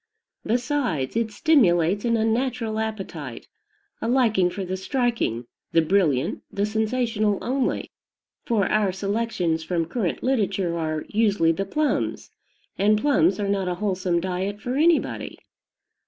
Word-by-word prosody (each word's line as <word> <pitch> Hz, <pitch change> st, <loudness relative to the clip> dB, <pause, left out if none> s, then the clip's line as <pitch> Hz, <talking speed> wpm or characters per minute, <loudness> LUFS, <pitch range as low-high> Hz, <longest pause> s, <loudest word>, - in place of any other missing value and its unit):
Besides, 240 Hz, -, -1 dB
it 230 Hz, -1 st, +1 dB
stimulates 205 Hz, -, +3 dB
an 230 Hz, -1 st, +2 dB
unnatural 225 Hz, 0 st, 0 dB
appetite, 190 Hz, -, -5 dB, 0.5 s
a -, -, -2 dB
liking 230 Hz, -7 st, +3 dB
for 195 Hz, +1 st, -5 dB
the 185 Hz, +1 st, -3 dB
striking, 230 Hz, -, -1 dB, 0.3 s
the 165 Hz, -, +5 dB
brilliant, 160 Hz, -7 st, +1 dB
the 200 Hz, 0 st, 0 dB
sensational 220 Hz, -1 st, 0 dB
only; 265 Hz, +1 st, -1 dB, 0.5 s
for 215 Hz, -5 st, +1 dB
our 210 Hz, -1 st, +2 dB
selections 195 Hz, -4 st, -1 dB
from 165 Hz, 0 st, -1 dB
current 185 Hz, +1 st, -2 dB
literature 200 Hz, -9 st, 0 dB
are, 155 Hz, -2 st, -2 dB
usually 205 Hz, -6 st, +3 dB
the 195 Hz, +4 st, -2 dB
"plums"; 300 Hz, +9 st, -1 dB, 0.5 s
and 210 Hz, +1 st, +4 dB
plums 295 Hz, +2 st, +3 dB
are 205 Hz, -, -1 dB
not 195 Hz, -2 st, 0 dB
a 180 Hz, -, -1 dB
wholesome 185 Hz, -3 st, 0 dB
diet 190 Hz, +3 st, -3 dB
for 245 Hz, +3 st, -4 dB
anybody. 320 Hz, +3 st, +1 dB
205 Hz, 130 wpm, -24 LUFS, 180-230 Hz, 0.5 s, the